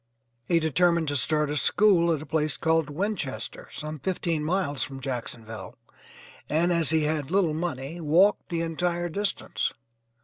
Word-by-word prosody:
He 170 - +3
determined 170 +1 +2
to 145 - -1
start 150 +2 +1
a 150 - -1
school 175 -1 +4
at 155 -2 -1
a - - -10
place 155 -2 -1
called 160 -2 +1
Winchester, 150 - -3
some 155 0 -6
fifteen 170 -2 -1
miles 155 -4 0
from 135 -1 -3
Jacksonville, 120 -3 -6 0.7
and 170 +4 +2
as 165 -3 +4
he 160 0 +3
had 150 -2 -1
little 185 -4 +2
money, 160 -1 -4
walked 175 +8 +3
the 170 -2 -1
entire 175 +1 -1
distance. 200 +4 -2
160 Hz, 150 wpm, -26 LUFS, 150-175 Hz, 0.7 s, school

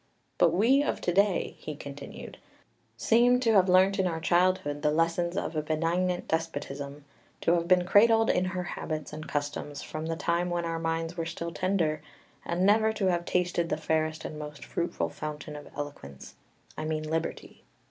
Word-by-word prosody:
But 170 - +6
we 230 +11 +4
of 290 - -1
to 175 - 0
day," 200 0 +2
he 150 - -6
continued, 140 -1 -9 0.6
"seem 245 +2 +4
to 230 -3 +3
have 190 -2 +5
learnt 190 +2 +4
in 190 - +3
our 165 -2 -2
childhood 175 -4 +1
the 150 - +2
lessons 170 +3 +1
of 165 - -2
a 155 - +1
benignant 170 +4 0
despotism, 145 -3 -4 0.4
to - - +2
have 170 -1 +1
been 180 -1 +4
cradled 225 +4 +5
in 180 - +1
her 185 -1 -2
habits 155 -3 -5
and 155 +1 -7
customs 145 0 -3
from 155 +1 -5
the 165 - -1
time 170 +2 0
when 175 -1 -1
our 165 0 -2
minds 165 +1 -2
were 165 -1 -2
still 170 0 -5
tender, 170 -4 0 0.4
and 175 +2 0
never 220 +2 +4
to 195 -4 +1
have 175 -1 -1
tasted 175 -2 0
the - - 0
fairest 155 0 -1
and 155 - -6
most 150 -1 -8
fruitful 170 - -2
fountain 150 -1 -6
of 145 - -9
eloquence, 140 - -7 0.4
I 155 - -5
mean 155 0 -2
liberty. 160 +1 -4
170 Hz, 180 wpm, -28 LUFS, 155-185 Hz, 0.6 s, But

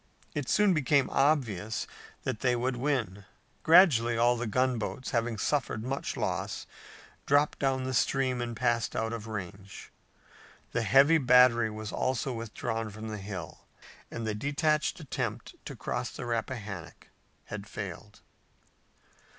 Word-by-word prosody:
It 145 -3 -3
soon 210 -2 +4
became 145 -3 +2
obvious 115 - +1 0.4
that 110 - -2
they 125 0 +2
would 125 +2 -1
win. 120 -7 -1 0.4
Gradually 130 - +6
all 120 +1 +4
of 120 - -4
the 120 - -2
gunboats, 130 +2 -1
having 115 -1 0
suffered 120 -4 -1
much 135 +3 -3
loss, - - -2 0.6
dropped 145 +1 +3
down 135 -1 +1
the 130 0 -3
stream 130 0 +1
and 120 -1 -4
passed 120 -2 0
out 115 +1 -1
of 115 -1 -6
range. 100 -2 -7 0.8
The 115 - 0
heavy 140 +8 +5
battery 125 -3 +5
was 110 0 -6
also 130 0 -1
withdrawn 115 0 -4
from 110 +2 -7
the 105 -1 -5
hill 95 -4 -8 0.4
and 115 - -5
the 110 - -1
detached 150 - 0
attempt 150 -5 -4
to - - -6
cross - - -3
the - - -7
Rappahannock 110 -6 -5 0.4
had 105 0 -7
failed. 105 0 -8
120 Hz, 140 wpm, -29 LUFS, 110-135 Hz, 0.8 s, Gradually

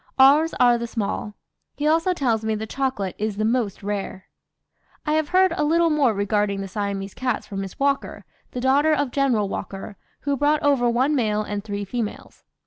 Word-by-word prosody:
Ours 290 +5 +5
are 245 -1 +5
the 235 - -3
small; 210 -2 -3 0.4
he 290 - -3
also 325 +4 +3
tells 240 -10 0
me 220 0 0
the 215 +1 -4
chocolate 225 -6 -2
is 210 -1 -2
the 215 - 0
most 225 -4 -1
rare. 195 -2 -4 0.8
"I 300 - +1
have 310 -1 +1
heard 370 0 +4
a 300 - 0
little 330 +2 +3
more 290 -5 +3
regarding 205 0 0
the 195 - -5
Siamese 200 -1 -4
cats 250 -3 -2
from 195 -2 -5
Miss 195 -1 -7
Walker, 275 0 -1 0.2
the 250 - -5
daughter 285 +4 +3
of 285 -3 -1
General 245 -7 +1
Walker, 195 +1 -6 0.2
who 285 -1 0
brought 295 +2 +1
over 275 -4 +3
one 255 +5 +2
male 215 -6 +1
and 205 -1 -4
three 205 -1 -4
females. 220 +1 -5
240 Hz, 190 wpm, -23 LUFS, 205-285 Hz, 0.8 s, Ours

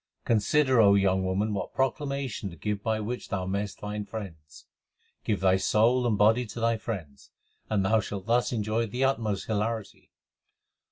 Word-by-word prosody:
Consider, 125 +3 +3
O 100 -1 +6
young 95 -1 +2
woman, 100 +3 0
what 95 -3 -4
proclamation 135 -4 -2
to 85 - -11
give 105 +4 -3
by 110 0 0
which 120 +4 -5
thou 95 -4 -2
mayest 100 +2 -3
find 105 0 -5
friends. 80 -10 -9 0.6
Give 105 - 0
thy 95 0 +3
soul 115 +6 +3
and 110 -3 +1
body 110 +4 +3
to 110 - -7
thy 115 0 +1
friends, 90 - -7 0.4
and 100 -3 +1
thou 110 +3 +3
shalt 100 -2 -5
thus 120 +2 +2
enjoy 110 0 -1
the 125 +5 -2
utmost 115 -7 0
hilarity. 110 0 -3
105 Hz, 165 wpm, -27 LUFS, 100-115 Hz, 0.6 s, O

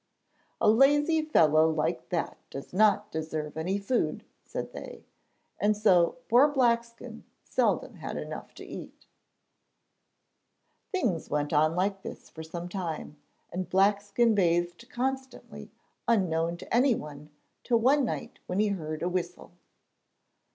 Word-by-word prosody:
'A - - +2
lazy 290 +8 +5
fellow 160 - +4
like 140 -6 -1
that - - -2
does 135 +4 -8
not 210 +2 +3
deserve 155 -1 -4
any 175 +5 -1
food,' 200 +5 -1 0.2
said - - -6
they, - - -9 0.5
and 210 0 +2
so 185 -4 +4
poor 250 +5 +6
Blackskin 235 -3 0 0.2
seldom - - 0
had - - -5
enough - - -7
to - - -10
eat. - - -10 1.9
Things 240 - -1
went 150 0 -1
on 155 +2 +3
like 195 +2 0
this - - -9
for 160 - -9
some 170 +2 -6
time, 170 -5 -5 0.4
and 185 +1 -3
Blackskin 205 +4 +3
bathed 175 +3 0
constantly 265 +1 -4 0.4
unknown 170 -6 +1
to 180 - -4
anyone 150 - 0 0.3
till 240 - +2
one 270 +5 +4
night 240 - -4
when 180 - -2
he 210 0 +3
heard 155 -5 -4
a - - +1
whistle. 185 - -4
195 Hz, 130 wpm, -28 LUFS, 160-235 Hz, 1.9 s, poor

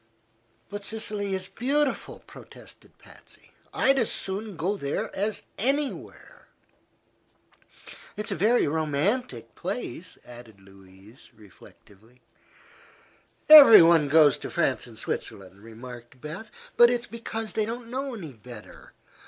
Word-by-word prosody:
"But 205 0 -8
Sicily 210 -2 -4
is 185 0 -6
beautiful," 280 +6 -2
protested - - -16
Patsy. - - -18 0.2
"I'd 270 0 +2
as 230 - 0
soon 200 +1 -4
go 180 +6 -2
there 140 -7 -4
as 205 +2 -3 0.2
anywhere." 275 +5 -4 1.7
"It's 210 +1 -5
a - - -1
very 220 +6 +2
romantic 150 - -2
place," - - -6
added 120 -4 -14
Louise, 95 +3 -18
reflectively. 105 +2 -20 1.3
"Everybody 175 - +9
goes 150 -1 +4
to - - -7
France - - -1
and - - -14
Switzerland," 95 0 -6
remarked 120 +2 -12
Beth. 155 - -9 0.3
"But 240 0 +7
it's 240 -1 -2
because 225 -1 -7
they 215 -1 -1
don't 235 0 -7
know 265 0 -4
any 165 -10 -9
better. 115 -1 -14
185 Hz, 115 wpm, -25 LUFS, -, 1.7 s, Everybody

